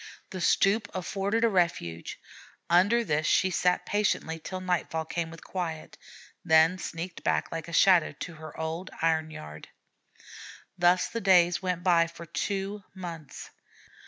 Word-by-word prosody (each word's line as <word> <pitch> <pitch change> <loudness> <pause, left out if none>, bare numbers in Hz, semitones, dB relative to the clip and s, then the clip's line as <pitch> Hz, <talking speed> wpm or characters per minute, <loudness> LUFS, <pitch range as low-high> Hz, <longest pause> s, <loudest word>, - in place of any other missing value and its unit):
The 185 -2 -5
stoop 200 +4 +2
afforded 200 +4 -1
a - - +6
refuge. 170 - -1 0.5
Under 205 +7 +4
this 155 -5 0
she 190 - +3
sat 180 0 +1
patiently 195 -5 0
till 185 +3 -6
nightfall 175 -3 -1
came 165 0 -3
with 165 0 -12
quiet, 165 -4 -5 0.5
then 160 +3 +4
sneaked 170 +1 -6
back - - 0
like 165 -1 -5
a - - -8
shadow 175 -1 +5
to 175 - -5
her 155 -1 -11
old 160 +3 -4
iron 160 -1 +2
yard. 75 - -10 1.1
Thus 180 0 +3
the 230 - -5
days 175 -2 +4
went 180 -2 -2
by 170 -2 +4
for 170 0 -11
two 200 +4 -3
months. 170 -5 -8
175 Hz, 145 wpm, -28 LUFS, 160-190 Hz, 1.1 s, a